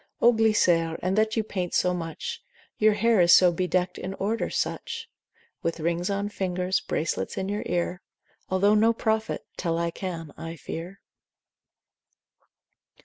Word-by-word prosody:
O 240 +1 +6
Glycere, 175 -7 +3
in 185 +1 +1
that 215 +2 +1
you 220 - +2
paint 185 -4 -3
so 180 - +3
much, 180 - -5 0.4
Your 215 0 +5
hair 220 -1 +3
is 170 0 +8
so 180 -1 +6
bedeckt 180 +1 0
in 190 +1 -5
order 215 +4 -1
such. - - -3 0.5
With 165 0 -2
rings 170 +3 -1
on 200 +1 -1
fingers, 185 -2 -1
bracelets 95 - -2
in 190 - -2
your 205 +1 -2
ear, 175 +1 -1 0.5
Although 195 +2 +3
no 220 +2 +4
prophet, 220 -1 -1
tell 165 -2 -1
I 170 0 0
can, 165 -5 -6
I 165 0 -7
fear. 170 +4 -7
185 Hz, 145 wpm, -26 LUFS, 170-210 Hz, 0.5 s, is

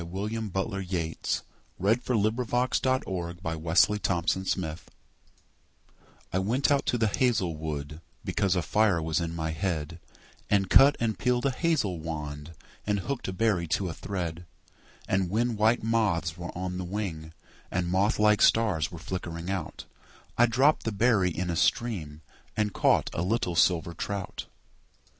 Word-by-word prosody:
William 105 +5 -4
Butler 95 +2 -2
Yeats 90 -4 -2 0.4
The 100 +4 +4
Song 125 0 -1
of 115 +2 -1 0.5
Wandering 85 -2 -4 0.9
Aengus 95 -3 -1 1.5
I 95 - +2
WENT 120 +10 +1
out 140 - +2
to 120 - +2
the 115 - +2
hazel 105 -7 +1
wood, 75 0 -5 0.2
Because 100 -3 +1
a 90 - 0
fire 105 -4 +2
was 80 0 0
in 85 0 -3
my 80 -1 -2
head, 80 -1 -3 0.5
And 100 -2 +2
cut 140 +2 +8
and 110 -4 -1
peeled 125 0 +1
a 140 - +3
hazel 130 - 0
wand, 75 -1 -6 0.3
And 100 -1 +1
hooked 140 +5 -4
a - - -2
berry 95 -3 +1
to 90 +3 0
a - - -4
thread; 85 -3 -5 0.6
And 95 -2 +1
when 115 +4 0
white 110 +2 +2
moths 105 -8 +1
were 85 -1 -7
on 90 0 -3
the - - -3
wing, 90 -5 -4 0.4
And 90 0 -1
moth 95 +4 +2
like 105 0 +4
stars 105 -9 +3
were 85 - -8
flickering 85 0 -5
out, 95 -5 -5 0.5
I 120 - +5
dropped 135 +6 +3
the 115 - -2
berry 105 -3 +3
in 90 +1 -3
a - - -2
stream 80 -8 0 0.4
And 105 -2 0
caught - - +2
a - - -2
little 90 -2 0
silver 85 0 +3
trout. 100 +3 -5
95 Hz, 150 wpm, -28 LUFS, 85-110 Hz, 1.5 s, cut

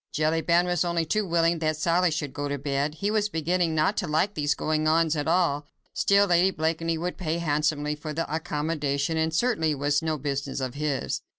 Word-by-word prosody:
Jellyband 165 +3 +2
was 175 -1 +1
only 170 -1 0
too 210 +5 0
willing 165 0 +2
that 155 -1 0
Sally 175 +3 +2
should 145 -3 -3
go 145 0 -3
to 145 0 -2
bed. 140 +2 -2
He 200 +5 -1
was 215 -1 +1
beginning 165 -1 0
not 155 +7 +2
to 185 - -1
like 160 +7 +1
these 145 -4 0
goings 155 0 0
on 165 +1 +3
at 145 -1 -2
all. 160 -4 +1 0.3
Still, 200 0 +4
Lady 180 0 +4
Blakeney 165 -1 -1
would 175 +3 -4
pay 165 -2 -1
handsomely 150 -2 0
for 150 +1 -6
the 165 +2 -2
accommodation, 150 -1 -1
and 160 0 0
it - - -4
certainly 160 -8 +1
was 145 +1 +1
no 160 -1 -1
business 140 0 -3
of 130 -2 -3
his. 145 -2 -2
160 Hz, 205 wpm, -26 LUFS, 150-170 Hz, 0.3 s, Still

